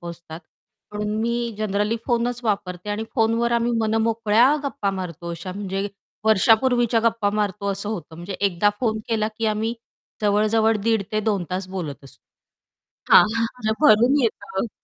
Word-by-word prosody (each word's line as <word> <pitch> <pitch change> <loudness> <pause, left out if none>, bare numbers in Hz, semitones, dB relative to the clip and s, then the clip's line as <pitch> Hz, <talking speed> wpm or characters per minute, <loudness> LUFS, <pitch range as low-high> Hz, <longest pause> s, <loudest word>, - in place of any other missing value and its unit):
पोहोचतात. 170 -1 -9 0.5
म्हणून 210 0 -3
मी 235 0 -1
जनरली 210 +1 0
फोनच 240 0 0
वापरते 200 -2 -2
आणि 215 +2 -2
फोनवर 230 0 +1
आम्ही 235 0 +1
मनमोकळ्या 225 +3 +3
गप्पा 270 -8 -1
मारतो 175 -3 -6
अशा 175 +2 -6
म्हणजे 195 0 -3 0.4
वर्षापूर्वीच्या 230 +2 +3
गप्पा 225 -3 +1
मारतो 205 -1 -1
असं 200 +2 -5
होतं. 170 -7 -6
म्हणजे 175 +4 -7
एकदा 200 +1 +2
फोन 220 -3 0
केला 220 -1 0
की 225 - 0
आम्ही 220 +2 -1 0.5
जवळ-जवळ 215 +2 +3
1:30 225 -1 +2
ते 215 - +1
2:00 205 -4 0
तास 185 +1 -3
बोलत 165 -8 -6
असू. 135 - -15 0.9
हां, - - +10
हां 230 0 +1
म्हणजे 220 -3 -2
भरून 245 +6 +5
येत. 210 -2 -2
215 Hz, 150 wpm, -23 LUFS, 195-230 Hz, 0.9 s, हां